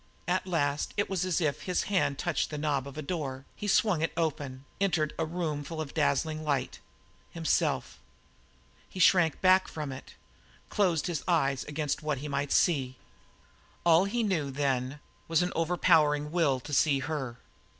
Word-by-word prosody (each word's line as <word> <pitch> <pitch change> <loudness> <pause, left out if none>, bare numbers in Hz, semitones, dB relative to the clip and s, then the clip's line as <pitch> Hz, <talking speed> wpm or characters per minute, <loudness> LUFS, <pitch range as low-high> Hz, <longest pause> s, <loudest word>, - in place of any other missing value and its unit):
At 185 +1 0
last 145 -5 -1
it 205 -1 0
was 185 -1 0
as 185 -3 +1
if 150 -5 -1
his 180 -1 -1
hand 185 -8 +1
touched - - -1
the 150 - -5
knob 145 -3 -1
of 140 +1 -10
a 155 - -4
door; 140 -5 -4
he 210 - -5
swung 195 -4 +3
it 165 - 0
open, 140 -5 -2 0.2
entered 175 -6 +1
a 160 - 0
room 160 -3 -2
full 160 +3 -6
of 155 -3 -5
dazzling 155 +1 0
light 140 -4 -1 0.5
himself. 165 -2 -1 0.9
He 185 - -8
shrank 175 -4 +4
back 185 0 +5
from 150 -3 -5
it; 130 - -10 0.5
closed 180 -6 +1
his 170 -5 -2
eyes 140 -6 +1
against 150 -1 -2
what 150 -2 -1
he 145 +4 -6
might 140 0 -2
see. 135 -7 +2 0.9
All 170 +2 +6
he 235 +4 -1
knew, 170 -9 0
then, 135 0 -1 0.3
was 165 +1 +2
an 180 - -1
overpowering 160 -3 +3
will 155 -6 +2
to 145 - -8
see 145 0 +4
her. 135 -4 -4
155 Hz, 170 wpm, -29 LUFS, 140-175 Hz, 0.9 s, All